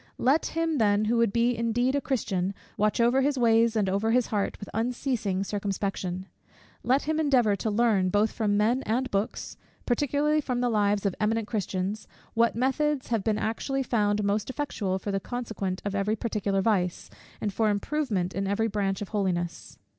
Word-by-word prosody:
Let 275 +6 +2
him 325 -3 +1
then, 210 -1 +3
who 230 +2 +1
would 230 -3 +3
be 235 +2 +2
indeed 235 +3 +1
a 285 - +1
Christian, 195 -8 -1 0.2
watch 210 +2 +1
over 240 +3 +4
his 280 0 +1
ways 230 -1 +4
and 210 -3 +2
over 200 +4 0
his 245 +1 +3
heart 205 -2 -2
with 205 - -8
unceasing 230 -4 -1
circumspection. 195 -2 -3 0.6
Let 265 +3 +2
him 315 +1 -1
endeavour 255 -9 +3
to 220 - -2
learn, 210 -4 +2
both 205 +3 +2
from 205 -2 0
men 230 +5 +2
and 250 +4 0
books, 200 +2 -2 0.3
particularly 290 +4 +1
from 250 -3 -2
the 245 0 +1
lives 205 -2 +1
of 195 - +1
eminent 220 +1 +1
Christians, 200 -1 -3 0.3
what 230 0 +2
methods 270 +3 0
have 225 -4 0
been 215 0 +1
actually 270 +6 -1
found 210 -4 +1
most 205 +2 0
effectual 225 -9 -2
for 200 +1 -4
the 195 - 0
conquest 210 -5 -4
of 200 - -2
every 200 +2 0
particular 205 -4 -1
vice, 185 -5 0 0.3
and 205 - -2
for 220 +1 +2
improvement 205 -4 -1
in 195 0 -2
every 210 +3 +1
branch 200 -1 -1
of 200 - -9
holiness. 180 -5 -2
220 Hz, 180 wpm, -27 LUFS, 200-245 Hz, 0.6 s, over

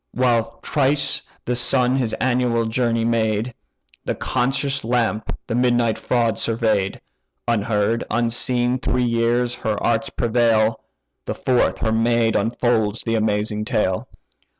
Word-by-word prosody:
While 115 -2 +1
thrice 140 0 +1 0.2
the 125 - 0
sun 125 +1 +3
his 125 -4 -1
annual 125 -2 +1
journey 115 0 0
made, 115 0 0 0.5
The - - -2
conscious 135 +2 -1
lamp 115 -2 -1
the 115 - -4
midnight 120 -2 +2
fraud 120 -3 0
survey'd; 110 -4 0 0.5
Unheard, 110 0 0
unseen, 120 +2 +1
three 125 0 0
years 120 +1 +1
her 110 -3 -2
arts 120 +4 +1
prevail; 115 -2 +1 0.4
The - - -3
fourth 125 -2 +1
her 110 - -1
maid 115 0 +2
unfolds 115 0 0
the 115 - -1
amazing 105 -1 0
tale. 95 -4 -1
115 Hz, 125 wpm, -21 LUFS, 110-125 Hz, 0.5 s, sun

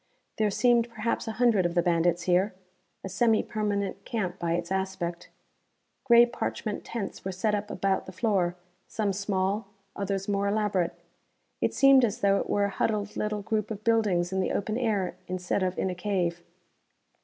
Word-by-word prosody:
There 215 -1 +3
seemed 240 +2 +3
perhaps 230 0 -2
a 225 - -2
hundred 230 -5 +3
of 175 0 -1
the 175 - +3
bandits 175 0 +2
here. 185 +2 +2 0.5
A - - -4
semi 220 +4 +2
permanent 205 -2 -2
camp, 190 -5 -3
by 170 -1 0
its 170 +1 -3
aspect. 190 -3 -3 0.8
Grey 235 -2 +7
parchment 220 -2 -4
tents 220 -5 -5
were 190 - -3
set 200 +4 0
up 205 0 -2
about 195 -2 -1
the - - -7
floor, 185 -3 0 0.3
some 205 -3 -1
small, 200 +1 -1 0.3
others 195 -1 -2
more 200 0 0
elaborate. 200 -4 0 0.7
It - - 0
seemed 275 -1 +6
as 235 +1 0
though 200 0 +4
it - - -4
were 205 0 +2
a - - -1
huddled 205 +1 -1
little 210 -1 -2
group 215 0 -1
of 215 -2 -6
buildings 205 -6 +2
in 190 - 0
the 185 - 0
open 215 +2 -1
air, 205 -7 0
instead 185 +1 -2
of 185 0 -1
in 190 - 0
a - - -3
cave. 180 -2 -1
200 Hz, 180 wpm, -28 LUFS, 185-215 Hz, 0.8 s, Grey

